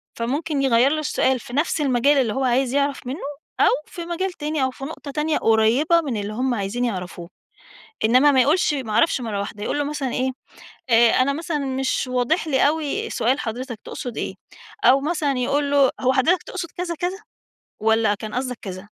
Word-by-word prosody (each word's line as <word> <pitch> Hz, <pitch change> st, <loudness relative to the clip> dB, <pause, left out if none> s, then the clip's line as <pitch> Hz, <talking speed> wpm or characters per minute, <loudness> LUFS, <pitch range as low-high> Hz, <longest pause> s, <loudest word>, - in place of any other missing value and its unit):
فممكن 280 Hz, +5 st, -2 dB
يغيّر 260 Hz, +1 st, +4 dB
له 310 Hz, -, 0 dB
السؤال 265 Hz, -3 st, +1 dB
في 240 Hz, -, -11 dB
نفس 300 Hz, +2 st, 0 dB
المجال 275 Hz, +1 st, +3 dB
اللي 240 Hz, -6 st, +1 dB
هو 270 Hz, -, -1 dB
عايز 255 Hz, +1 st, +1 dB
يعرف 280 Hz, -2 st, 0 dB
منّه 265 Hz, +5 st, -4 dB, 0.4 s
أو -, -, +5 dB, 0.2 s
في 340 Hz, -1 st, -7 dB
مجال 360 Hz, +3 st, -2 dB
تاني 300 Hz, -4 st, -2 dB
أو 260 Hz, -, +1 dB
في 270 Hz, -, -11 dB
نقطة 285 Hz, -1 st, -7 dB
تانية 300 Hz, +2 st, 0 dB
قريّبة 235 Hz, +10 st, +3 dB
من 270 Hz, -8 st, -3 dB
اللي 205 Hz, +1 st, -4 dB
هم 250 Hz, +2 st, 0 dB
عايزين 215 Hz, +3 st, -2 dB
يعرفوه. 180 Hz, -5 st, -5 dB, 0.8 s
إنّما 255 Hz, +6 st, +5 dB
ما 260 Hz, -, +4 dB
يقولش 300 Hz, +4 st, +3 dB
ما 255 Hz, -6 st, -4 dB
أعرفش 235 Hz, +6 st, +3 dB
مرّة 220 Hz, -4 st, -3 dB
واحدة، 205 Hz, +1 st, -5 dB
يقول 290 Hz, -, -1 dB
له 290 Hz, -, 0 dB
مثلًا 285 Hz, -3 st, -3 dB
إيه، 260 Hz, 0 st, 0 dB, 0.6 s
آآ 230 Hz, 0 st, +6 dB
أنا 260 Hz, +2 st, +2 dB
مثلًا 310 Hz, +1 st, -3 dB
مش 265 Hz, -1 st, -1 dB
واضح 255 Hz, +7 st, +1 dB
لي 275 Hz, -1 st, +3 dB
أوي 320 Hz, +9 st, -2 dB
سؤال 260 Hz, +5 st, +1 dB
حضرتك 240 Hz, +1 st, -5 dB
تقصد 245 Hz, -3 st, -6 dB
إيه؟ -, -, -3 dB, 0.5 s
أو 270 Hz, +2 st, +6 dB
مثلًا 295 Hz, -3 st, -1 dB
يقول 280 Hz, +3 st, 0 dB
له، 280 Hz, -2 st, +4 dB
هو 260 Hz, 0 st, +2 dB
حضرتك 330 Hz, +8 st, +2 dB
تقصد 370 Hz, -3 st, -6 dB
كذا، 345 Hz, -1 st, -3 dB
كذا 355 Hz, +4 st, -3 dB, 0.6 s
والّا 220 Hz, -1 st, +3 dB
كان 215 Hz, +1 st, -8 dB
قصدك 255 Hz, -1 st, -2 dB
كذ؟ 185 Hz, -1 st, -7 dB
265 Hz, 195 wpm, -22 LUFS, 240-295 Hz, 0.8 s, آآ